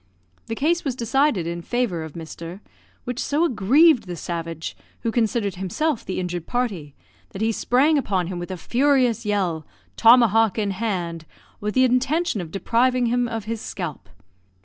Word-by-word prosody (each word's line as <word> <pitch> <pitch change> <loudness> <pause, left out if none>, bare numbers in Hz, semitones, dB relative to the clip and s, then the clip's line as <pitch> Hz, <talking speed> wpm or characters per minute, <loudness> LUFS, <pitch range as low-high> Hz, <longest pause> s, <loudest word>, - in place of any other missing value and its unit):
The 225 - -3
case 335 +7 +1
was 270 -4 -2
decided 250 - +1
in 170 +1 -4
favour 215 -6 -1
of 160 -2 -8
Mr., 165 +2 -8 0.4
which 245 0 -4
so 300 +4 +1
aggrieved 260 - +4
the 175 - -4
savage, 165 -1 -5 0.3
who 230 - -1
considered 220 -3 0
himself 225 - -1
the 185 - -4
injured 175 -2 -4
party, 200 - -2 0.4
that 195 - -6
he 225 - +2
sprang 280 +7 +3
upon 190 -8 -1
him 180 0 -5
with 175 - -6
a 185 - -4
furious 245 - +2
yell, 185 -6 0 0.3
tomahawk 225 -3 +5
in 205 -2 0
hand, 180 -6 -3 0.3
with 210 0 -3
the 260 - +5
intention 260 - +1
of 170 - -7
depriving 245 +7 +1
him 245 0 +1
of 225 -2 -4
his 225 0 -4
scalp. 175 -7 -6
220 Hz, 165 wpm, -23 LUFS, 180-250 Hz, 0.4 s, tomahawk